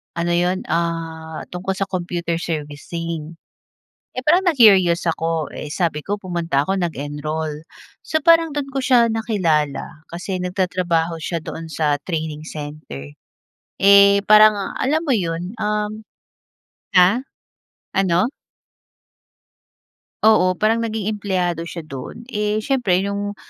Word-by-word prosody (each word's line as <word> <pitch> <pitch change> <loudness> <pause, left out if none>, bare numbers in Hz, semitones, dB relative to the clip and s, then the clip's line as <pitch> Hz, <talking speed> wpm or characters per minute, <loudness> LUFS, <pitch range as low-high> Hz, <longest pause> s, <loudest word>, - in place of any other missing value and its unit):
ano 170 0 -1
iyon 180 +2 0
ah, 165 -1 -3
tungkol 180 +2 -3
sa 195 - -1
computer 175 -2 -2
servicing. 165 +1 -5 0.8
Eh, - - -2
parang 350 +5 +5
na-curious 195 - +5
ako 165 -1 -1
eh, 150 - -6
sabi 155 -3 -1
ko 205 +1 -2
pumunta 170 -6 -1
ako 195 - +1
nag-enroll. 155 -1 -3 0.4
So 315 - 0
parang 330 +1 +5
doon 290 -2 -2
ko 270 - 0
siya 245 -3 +5
nakilala, 165 -10 -1
kasi 185 +2 -4
nagtatrabaho 180 -3 0
siya 170 +1 -2
doon 165 +1 -7
sa 150 -2 0
training 155 -3 -4
center. 145 - -8 0.7
Eh, 200 0 +7
parang 215 -1 +5
alam 300 +4 +2
mo 275 - +1
iyon 175 +2 -3
um, 210 0 -2 0.9
ha, 190 +8 +5 0.7
ano? 190 +3 +2 2.0
Oo, 185 -4 +5
parang 225 +4 +2
naging 220 -2 -2
empleyado 180 -5 -2
siya 170 -3 -7
do’n, 155 - -8
eh, 210 0 0
siyempre, 250 -10 +2
'yong 200 0 -3
180 Hz, 120 wpm, -20 LUFS, 160-210 Hz, 2.0 s, Eh